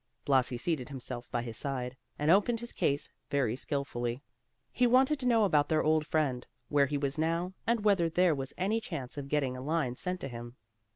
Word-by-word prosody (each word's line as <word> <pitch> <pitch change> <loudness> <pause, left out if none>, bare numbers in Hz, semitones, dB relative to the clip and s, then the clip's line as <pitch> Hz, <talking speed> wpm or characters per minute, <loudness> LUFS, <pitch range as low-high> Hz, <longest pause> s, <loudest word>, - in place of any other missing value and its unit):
Blasi 130 -3 +3
seated 145 -1 -1
himself 120 -3 -6
by 120 -1 -1
his 115 -2 -5
side, 130 -2 -3 0.2
and 150 +2 +3
opened 210 +5 +4
his 235 +1 -7
case 140 +1 0 0.2
very 130 -5 +1
skilfully. 130 -2 -3 0.5
He 245 - +3
wanted 265 +4 +4
to 250 - -1
know 230 -3 +4
about 150 -6 +3
their 155 -1 +2
old 155 0 +2
friend; 135 -6 0 0.2
where 140 -1 +4
he 145 +2 -1
was 140 +1 -2
now, 165 +3 0
and 230 -2 +1
whether 190 -5 +4
there 175 +1 +3
was 135 -2 -4
any 210 +5 0
chance 130 - -6
of 140 -1 -6
getting 140 -4 0
a 130 - -6
line 145 -3 0
sent 180 +6 -3
to - - -3
him. 120 -1 -8
145 Hz, 205 wpm, -31 LUFS, 130-180 Hz, 0.5 s, opened